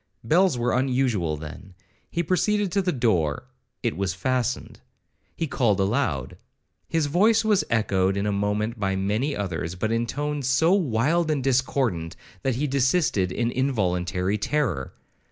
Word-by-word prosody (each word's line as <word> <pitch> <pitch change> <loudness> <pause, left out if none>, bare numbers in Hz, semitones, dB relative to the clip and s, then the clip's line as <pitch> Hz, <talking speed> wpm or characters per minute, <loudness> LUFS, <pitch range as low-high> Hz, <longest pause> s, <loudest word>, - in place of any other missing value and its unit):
Bells 170 +4 +3
were 120 0 0
unusual 125 - +1
then. 85 +5 -10 0.3
He 170 - -1
proceeded 200 +3 +1
to 200 - +2
the 180 -1 0
door,—it 120 - -2
was 95 -1 -2
fastened. 125 +5 -2 0.6
He 165 - -1
called 115 -9 +1
aloud,—his 95 - -2
voice 215 +9 +3
was 210 -3 +3
echoed 100 -4 +1
in 100 - -1
a 105 - +1
moment 105 +3 -1
by 95 -2 0
many 105 +9 -1
others, 90 -3 -3
but 110 +4 -2
in 115 +1 0
tones 145 +1 -2
so 160 +7 +4
wild 160 - +1
and 145 -4 0
discordant, 125 -10 0 0.3
that 130 +3 0
he 140 +5 -1
desisted 135 - +1
in 120 +4 -1
involuntary 95 -6 0
terror. 125 - -1
120 Hz, 140 wpm, -25 LUFS, 95-145 Hz, 0.6 s, so